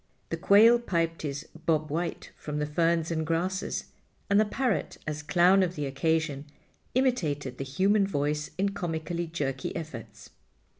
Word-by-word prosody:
The - - -1
quail 225 +4 +6
piped 165 -7 -1
his 145 0 -4 0.2
"Bob 155 -2 +1
White" 170 +3 -3
from 150 -1 -5
the 150 - 0
ferns 165 +2 +1
and 160 -1 0
grasses; 175 +4 -1 0.5
and 200 - +6
the 215 - +4
parrot—as 205 - -2
clown 180 +5 +4
of 180 -1 0
the 150 - -2
occasion—imitated 150 - -2
the - - -1
human 195 +9 +2
voice 150 -3 -1
in 195 +2 +1
comically 170 -2 -3
jerky 140 -5 -3
efforts. 115 -9 -8
165 Hz, 140 wpm, -28 LUFS, 150-185 Hz, 0.5 s, quail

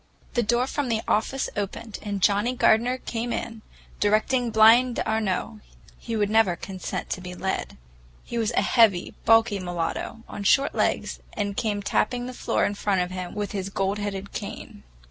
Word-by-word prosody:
The 240 - +2
door 240 +2 +2
from 275 -1 -2
the 225 -1 0
office 260 +5 0
opened, 205 +2 -4
and 200 -3 -4
Johnnie 210 +6 +3
Gardener 240 +2 +3
came 240 -1 -4
in, 225 -2 -4 0.4
directing 225 +4 +2
Blind 230 +3 +6
d'Arnault,—he 220 +2 -3
would 210 -2 +2
never 215 -4 +3
consent 190 +1 -6
to 185 - -2
be 180 0 -7
led. 190 +1 -3 0.5
He 235 - -4
was 220 -2 +1
a - - +2
heavy, 210 -5 +3
bulky 225 -2 +4
mulatto, 175 +5 -4
on 205 - -6
short 275 +7 +3
legs, - - 0
and 205 -1 -1
he - - -5
came 205 -1 -2
tapping 245 +4 0
the 255 - -6
floor - - 0
in 205 - -1
front 200 -2 0
of 180 0 -2
him 185 -1 -5
with 205 -1 -3
his 195 -2 -3
gold 195 +1 -1
headed 200 -1 -4
cane. - - -7
215 Hz, 175 wpm, -25 LUFS, 200-230 Hz, 0.5 s, Blind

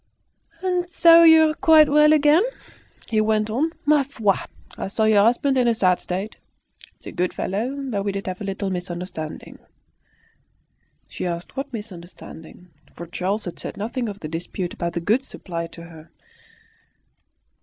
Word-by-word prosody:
"And 360 -1 -1
so 335 -1 +6
you're 320 -1 +6
quite 310 -1 +5
well 300 +1 +5
again?" 305 +2 +5 0.7
he 220 -1 +1
went 215 0 0
on. 285 +9 0 0.2
"Ma 295 0 +4
foi! 230 -7 0 0.4
I - - -5
saw 205 +3 -1
your 215 -2 +4
husband 260 +4 +2
in 245 - +2
a 235 - +2
sad 185 -4 +2
state. 190 +4 -5 0.6
He's - - -19
a - - -7
good 180 0 -2
fellow, 225 +8 -3
though 255 -8 -3
we 200 0 -2
did 195 0 -5
have 185 +1 -5
a - - -3
little 195 0 -3
misunderstanding." 175 -3 -6 1.5
She - - -5
asked 170 +4 -6
what 275 +1 -5
misunderstanding, 180 -4 -11 0.3
for 170 - -8
Charles 190 +5 -3
had 175 - -7
said - - -7
nothing 230 +3 -3
of 205 0 -9
the 155 - -5
dispute 170 +3 -5
about 170 0 -4
the 170 - -3
goods 225 +9 0
supplied 170 -2 -6
to 170 - -11
her. 165 -2 -14
210 Hz, 165 wpm, -22 LUFS, 180-275 Hz, 1.5 s, so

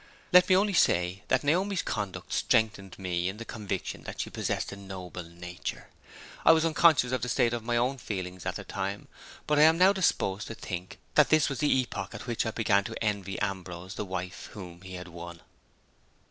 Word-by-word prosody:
Let 180 0 +8
me 185 - +6
only 200 +1 +2
say 90 - +2
that 130 - +2
Naomi's 185 +5 +1
conduct 100 -2 -4
strengthened 105 -4 +1
me 90 -1 -1
in 95 - -6
the 115 - -7
conviction 100 -5 -4
that - - -7
she - - -3
possessed - - -2
a - - -6
noble 95 -3 -7
nature. 90 +1 -7 0.5
I - - +8
was 160 0 +3
unconscious 155 -5 +4
of 130 -2 0
the 125 - -2
state 120 0 +2
of 120 -2 -3
my 120 +1 0
own 130 +3 +1
feelings 95 -5 -5
at - - -2
the - - -5
time; 100 +1 -4 0.4
but 150 -1 +2
I - - +8
am 160 +1 +5
now 185 +3 +6
disposed 105 - 0
to 115 - -6
think 90 -3 -6 0.2
that - - +5
this 155 -2 +4
was 135 -3 -4
the 145 - +2
epoch 100 -5 -6
at - - -7
which 120 -2 -1
I - - +1
began 105 -3 +2
to 115 - -5
envy 100 -3 -2
Ambrose 95 -2 -4
the - - -3
wife 95 -2 -5
whom 90 -4 -9
he 95 0 -8
had 90 0 -7
won. 85 0 -9
100 Hz, 205 wpm, -29 LUFS, 90-130 Hz, 0.5 s, Let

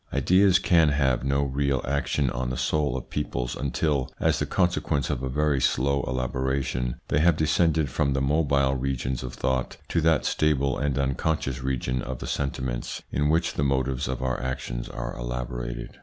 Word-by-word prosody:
Ideas 95 0 +4
can 85 -6 +4
have 65 -4 +1
no 70 +1 +1
real 70 0 0
action 70 -1 0
on 65 0 -2
the 65 - -3
soul 65 +1 0
of 65 - -8
peoples 60 -4 -2
until, 70 0 0
as - - +2
the - - -1
consequence 85 -6 0
of - - -2
a 65 - -2
very 75 0 +1
slow 70 +3 +2
elaboration, 65 0 -1
they 70 - +2
have 85 0 +4
descended 80 0 +2
from 70 +2 0
the 70 - 0
mobile 70 -1 +2
regions 65 -1 -2
of 65 -1 -6
thought 65 -1 -1
to 85 - +1
that 80 -2 +3
stable 70 -4 +1
and 70 -1 -1
unconscious 65 -1 -1
region 65 -1 -1
of 65 +1 -5
the - - -7
sentiments 65 -3 -3
in 75 +1 +1
which 85 +1 +2
the 70 - -1
motives 65 -1 0
of 65 0 -3
our 65 -1 -1
actions 60 -2 -4
are - - -5
elaborated. - - -5
70 Hz, 175 wpm, -26 LUFS, 65-75 Hz, -, Ideas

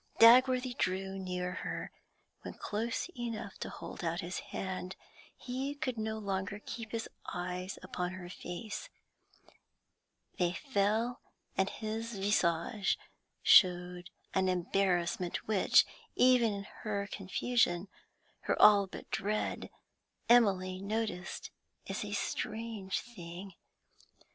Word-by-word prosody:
Dagworthy 250 +2 +7
drew 190 +1 -1
near 180 -1 -2
to - - -6
her; - - -4 0.5
when - - -7
close 230 +3 -2
enough 230 -5 -5
to - - -4
hold - - -8
out 170 +2 -1
his 175 +1 -4
hand, 190 0 -5 0.4
he 265 +3 -3
could 255 -5 -3
no 220 0 -2
longer 195 -1 -2
keep 225 -2 -6
his 230 -1 -2 0.2
eyes 180 +1 -4
upon 180 0 -3
her 185 -1 -7
face; 205 - -6 1.5
they 175 -1 +2
fell, 230 0 0 0.3
and 190 +1 +2
his 225 +2 -4
visage 195 0 +1 0.5
showed 180 -1 +5 0.2
an 190 -1 +2
embarrassment 180 -1 0
which, 210 -3 +5 0.3
even 250 -3 +5
in 200 -1 -4 0.2
her 200 -2 -1
confusion 195 -1 +1 0.6
her - - +1
all 205 -2 +8
but - - -10
dread 205 +2 -1 0.6
Emily 190 -6 +4
noticed 210 -3 -3 0.4
as - - -3
a - - -5
strange 220 -4 -2
thing. 185 -4 -9
200 Hz, 115 wpm, -33 LUFS, 185-225 Hz, 1.5 s, all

